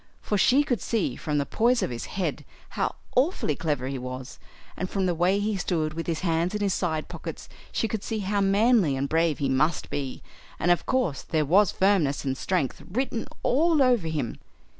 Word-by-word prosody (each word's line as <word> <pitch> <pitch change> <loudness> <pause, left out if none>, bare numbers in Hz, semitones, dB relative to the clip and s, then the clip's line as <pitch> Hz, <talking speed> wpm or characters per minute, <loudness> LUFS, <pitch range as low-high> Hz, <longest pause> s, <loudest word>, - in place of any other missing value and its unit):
For 210 - -2
she 260 +8 +4
could 245 - -1
see 205 - -1
from 150 +2 -2
the 140 - +1
poise 235 - +2
of - - -2
his 120 - -5
head 190 -2 -3 0.3
how - - -2 0.2
awfully 255 - +2
clever 145 -5 -1
he 135 -1 -3
was; 130 +1 -7 0.4
and 185 - -3
from 195 -2 0
the 180 - +1
way 175 +4 +2
he 210 +1 0
stood 160 -4 -1
with 165 +1 -5
his 165 -2 -1
hands 170 +2 0
in 210 - -2
his 200 -2 +1
side 160 -4 -1
pockets - - -7 0.2
she 225 - 0
could 220 -2 -3
see 225 - -3
how 200 +1 0
manly 200 - +3
and 135 +1 -1
brave 160 0 +2
he 140 - 0
must 140 +5 +1
be; 135 -3 -4 0.3
and 175 - +2
of 175 - +1
course 250 - 0
there 155 -2 0
was 190 +6 +4
firmness 185 -9 +2
and 135 -1 0
strength 165 -2 -1
written 235 +1 -2 0.2
all 315 +4 +3
over 245 -9 +3
him. 150 -8 -3
175 Hz, 205 wpm, -26 LUFS, 150-210 Hz, 0.4 s, she